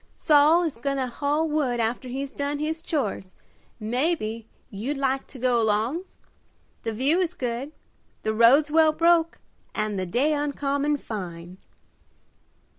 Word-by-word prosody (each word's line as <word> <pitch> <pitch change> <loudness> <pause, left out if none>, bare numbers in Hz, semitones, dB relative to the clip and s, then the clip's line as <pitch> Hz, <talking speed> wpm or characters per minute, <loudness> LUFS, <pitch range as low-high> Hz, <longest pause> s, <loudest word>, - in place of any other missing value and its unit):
"Saul 305 +3 +5
is 315 -8 -3
goin' 275 +3 -2
to 265 - 0
haul 290 +5 -1
wood 285 -6 0
after 235 +3 -1
he's 270 +2 -4
done 285 +1 -3
his 315 +2 -2
chores, 215 - -3 0.4
mebbe 230 -1 -1 0.3
you'd 235 +8 -3
like 270 0 -1
to 275 - -11
go 245 -1 +2
along? 225 - 0 0.8
The 225 - -3
view 270 +10 +2
is 360 -1 -1
good, 250 +3 -3 0.5
the 220 - 0
roads 260 +7 +5
well 315 0 +5
broke, 335 0 +3 0.4
and 215 -2 -1
the 185 - -3
day 265 - +1
uncommon 290 0 0
fine." 180 -6 -7
275 Hz, 140 wpm, -25 LUFS, 230-300 Hz, 0.8 s, Saul